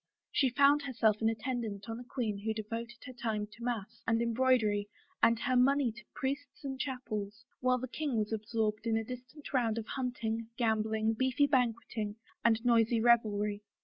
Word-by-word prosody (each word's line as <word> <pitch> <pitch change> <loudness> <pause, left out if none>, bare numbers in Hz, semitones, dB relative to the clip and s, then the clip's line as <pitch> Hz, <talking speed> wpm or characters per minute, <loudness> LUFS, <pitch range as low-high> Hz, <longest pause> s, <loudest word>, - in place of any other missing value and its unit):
She 270 -3 +3
found 280 +4 +5
herself 230 -6 +1
an 220 - +4
attendant 225 -3 -3
on 225 +1 -4
a - - -7
queen 235 -5 -3
who 220 +2 -2
devoted 230 +2 -5
her 255 - -8
time 220 -4 -2
to 215 +3 -13
mass 235 -5 -3
and 225 0 +3
embroidery 230 -4 +2 0.3
and 230 0 +5
her 255 -2 +1
money 265 0 +4
to 240 +2 -13
priests 290 +1 -4
and 270 -1 -4
chapels, 235 -5 -4
while 255 0 +3
the 255 +1 -4
king 280 -1 -2
was 215 +1 0
ab 220 -1 -2
sorbed 220 -1 0
in 225 -1 +2
a 225 - -1
distant 250 +5 -9
rotmd 230 -4 +2
of 225 - -3
hunting, 230 -3 -3
gambling, 220 -1 +1
beefy 260 +4 +2
banqueting, 230 -5 0 0.3
and 230 0 +3
noisy 230 -1 +4
revelry. 210 -3 +3
230 Hz, 180 wpm, -32 LUFS, 220-255 Hz, 0.3 s, found